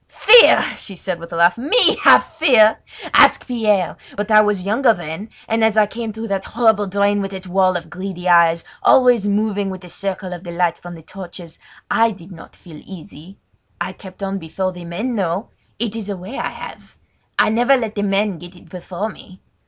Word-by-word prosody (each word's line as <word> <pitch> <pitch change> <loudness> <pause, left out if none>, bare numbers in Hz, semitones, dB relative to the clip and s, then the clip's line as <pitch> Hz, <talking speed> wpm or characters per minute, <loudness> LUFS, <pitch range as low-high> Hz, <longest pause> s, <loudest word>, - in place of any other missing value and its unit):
"Fear!" 475 +2 +6
she 195 - -6
said 180 -1 -5
with 170 0 -11
a - - -5
laugh. 170 +5 +3
"Me 365 - +3
have - - +6
fear? 250 -10 +3 0.3
Ask - - +5
Pierre! 210 -7 0 0.2
But 205 +2 -3
I 215 0 +7
was 210 -3 -1
younger 225 +3 +2
then, 175 +5 -8 0.2
and, 225 0 0
as 220 -1 +2
I 215 - +5
came 225 +1 -6
through 220 +1 -7
that 195 -1 -2
horrible 220 -3 +1
drain 200 +1 0
with 195 0 -5
its 190 -1 -8
wall 185 0 +1
of 175 - -11
greedy 185 0 -6
eyes, 170 -1 +4 0.2
always 245 -5 +4
moving 205 -1 -1
with 185 -1 -8
the 180 -2 -13
circle 190 0 -5
of 175 0 -9
the 175 - -9
light 170 0 -1
from 175 0 -10
the 165 - -14
torches, 175 -2 -11 0.3
I 230 0 +3
did 190 -3 -12
not 165 - -14
feel 155 -4 -14
easy. 180 0 -13 0.4
I - - -4
kept 190 0 -12
on 195 0 -3
before 185 +3 -4
the 180 -1 -11
men, 210 +9 -4
though! 190 0 -3 0.3
It 225 -1 -3
is 215 -3 -6
a 200 - -4
way 190 +9 -9
I - - -2
have! - - -12 0.4
I - - +3
never 240 +5 +3
let 225 -4 -4
the 205 - -3
men 200 -2 -1
get 175 +2 -13
it 175 - -18
before 180 +4 -6
me. 185 -2 -15
195 Hz, 205 wpm, -18 LUFS, 180-220 Hz, 0.4 s, I